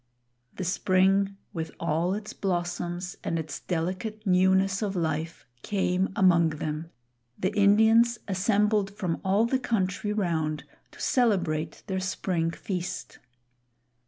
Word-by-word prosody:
The 185 - -4
Spring, 195 +2 +2 0.2
with 165 -3 -3
all 170 +3 0
its 210 0 -6
blossoms 175 -1 -3
and 165 - -1
its 160 -1 -5
delicate 190 +6 -3
newness 190 +1 +3
of 200 -2 -2
life, 160 -1 -2 0.2
came 190 0 0
among 170 -4 +5
them; 155 +1 -4 0.5
the 190 +2 -1
Indians 220 +3 +5
assembled 205 +1 +2
from 180 -6 -2
all 200 +4 +3
the 260 +2 +1
country 205 -4 -1
round 160 -7 -1 0.3
to - - -15
celebrate 180 - 0
their 190 -1 -2
spring 185 -3 -1
feast. 180 +1 -5
190 Hz, 120 wpm, -27 LUFS, 170-205 Hz, 0.5 s, among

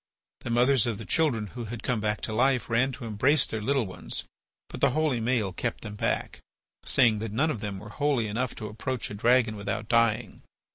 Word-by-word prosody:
The - - -7
mothers 125 0 +4
of 115 -4 -1
the 110 - -8
children 120 - +1
who 120 -2 -5
had 115 +1 -7
come 125 -4 0
back 105 0 -1
to 110 - -3
life 125 0 +2
ran 120 +4 +3
to 125 -1 -7
embrace 130 +7 +2
their 110 - -4
little 135 +1 +1
ones. 95 - -4 0.4
But - - -9
the - - +5
holy 150 -7 +1
Maël 110 -5 0
kept 120 - -3
them 105 -2 -7
back, 105 - -2 0.4
saying 115 -5 +4
that 110 -1 -4
none 145 +9 +1
of 115 - -4
them 105 -2 -4
were 105 +2 -10
holy 140 0 0
enough 115 +4 -2
to 110 - -6
approach 115 +3 -3
a - - -5
dragon 115 +1 +3
without 100 +1 -4
dying. 115 -1 +1
115 Hz, 210 wpm, -27 LUFS, 105-130 Hz, 0.4 s, the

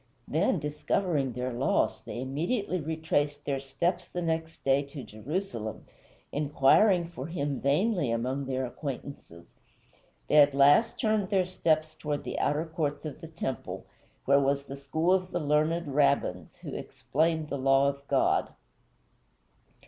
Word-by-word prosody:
Then, 170 +5 +1
discovering 150 -1 -1
their 125 +1 -3
loss, 125 +3 +1
they - - -7
immediately 175 - -1
retraced 150 -2 -1
their 140 -1 -1
steps 140 +7 -2
the 175 - -4
next 160 0 -3
day 135 +1 +3
to 140 -1 -8
Jerusalem, 115 - -5 0.5
inquiring 150 +6 +4
for 165 -5 -7
him 145 -5 -2
vainly 165 - +2
among 130 +4 -1
their 130 -1 -1
acquaintances. 130 - -8 0.7
They 150 - +3
at 145 -2 +6
last 145 +10 +5
turned 215 -3 +1
their 190 -2 +2
steps 155 -3 0
toward 150 -1 -3
the - - -4
outer 150 +3 +1
courts 155 -3 -3
of 155 +1 -6
the 165 - -7
temple, 155 -6 -5 0.4
where 140 +1 +5
was 140 0 +1
the 140 - -8
school 160 +6 0
of 185 -1 +1
the 175 - -2
learned 155 +3 +1
Rabbins 135 - +1
who - - -6
explained 160 +1 -1
the 140 - -3
law 135 +1 +4
of 140 0 -3
God. - - +2
145 Hz, 145 wpm, -29 LUFS, 135-165 Hz, 0.7 s, at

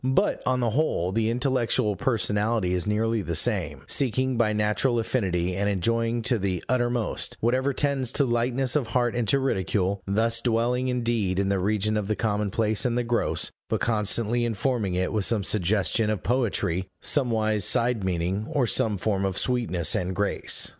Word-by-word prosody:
But, 130 +1 +1
on 130 0 +1
the 115 -2 +1
whole, 110 - 0
the 110 +2 0
intellectual 120 -4 0
personality 105 -4 0
is 90 +2 -1
nearly 110 +1 0
the 85 -3 -3
same: 85 - 0
seeking 130 - +1
by 115 -2 +2
natural 105 +4 +1
affinity, 90 -7 -1
and 100 +2 0
enjoying 115 +4 0
to 120 0 +2
the 95 -3 -2
uttermost, 120 -2 0
whatever 130 +4 +1
tends 135 -3 0
to 140 - +3
lightness 120 +1 0
of 140 -6 +1
heart 120 0 0
and 120 -2 -1
to 140 - +3
ridicule 100 -6 -1
thus 115 +3 +1
dwelling 120 +2 0
indeed 115 -7 -1
in 100 0 +1
the 100 -1 +1
region 105 +2 0
of 105 -2 -2
the 110 - 0
commonplace 105 0 0
and 120 -1 0
the 120 - +1
gross, 120 0 -1 0.2
but - - 0
constantly 115 +1 0
informing 115 -3 -1
it 90 +3 -1
with 105 -3 +1
some 110 -4 +2
suggestion 105 +3 +1
of 105 -2 -2
poetry, 100 -7 0
somewise 110 -6 +1
side 115 +1 +1
meaning, 95 +4 -2
or 135 -4 +1
some 110 -2 +1
form 100 0 -1
of 95 -1 -2
sweetness 120 -10 0
and 90 +1 -2
grace. 100 0 0
110 Hz, 175 wpm, -25 LUFS, 100-120 Hz, 0.2 s, to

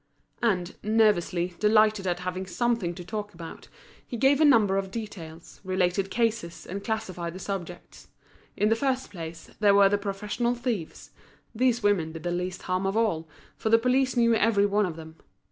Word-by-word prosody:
And, 190 -6 0
nervously, 200 -5 +2
delighted 215 -2 +3
at 180 0 -1
having 185 +1 -4
something 190 -2 -1
to 175 - -9
talk 210 0 -5
about, 165 -1 -10 0.4
he 240 - -6
gave 275 +5 +4
a - - +7
number 215 -9 +5
of 195 -1 -2
details, 175 -7 -8
related 185 0 0
cases, 225 -7 -1
and 200 +2 -6
classified 185 -6 -3
the - - -7
subjects. 180 -2 -7 0.5
In 210 - +2
the 225 - +4
first 265 0 -1
place, 165 -3 -8
there 205 -2 +5
were 200 -1 +6
the 205 0 +1
professional 210 +4 -2
thieves; 235 -9 -4 0.4
these 245 0 +1
women 180 -6 +1
did 165 - -8
the 175 - -1
least 180 +1 -3
harm 185 +1 -1
of 195 +3 -1
all, 165 -8 0 0.3
for 220 - -2
the 225 - +7
police 255 +2 +1
knew 235 -1 +4
every 215 -2 +3
one 205 0 +2
of 165 - -6
them. 160 0 -11
200 Hz, 180 wpm, -27 LUFS, 180-225 Hz, 0.5 s, a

